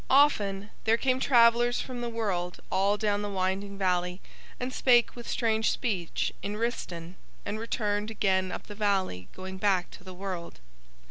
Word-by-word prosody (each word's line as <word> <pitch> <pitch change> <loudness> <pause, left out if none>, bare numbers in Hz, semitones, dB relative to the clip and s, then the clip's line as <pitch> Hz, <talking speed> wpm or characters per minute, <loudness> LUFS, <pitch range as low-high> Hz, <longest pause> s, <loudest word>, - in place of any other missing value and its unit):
Often 210 -8 +3
there 225 +1 +4
came 255 +1 +1
travellers 240 -2 +5
from 250 -2 -5
the 240 - -2
world 190 -6 -2
all 200 +2 +2
down 205 -1 +1
the 205 - -3
winding 195 +1 -2
valley, 180 -1 0 0.4
and 250 +1 -3
spake 240 -2 +4
with 240 -1 -8
strange 220 -2 +2
speech 190 -9 -1
in 205 +1 -3
Rhistaun 180 -7 -3 0.3
and 210 +2 -3
returned 210 -2 -1
again 190 -3 +1
up - - -6
the 210 - -8
valley 195 - 0
going 190 0 -7
back 190 -3 +1
to - - -13
the 185 -1 -9
world. 180 - -6
205 Hz, 160 wpm, -29 LUFS, 185-230 Hz, 0.4 s, travellers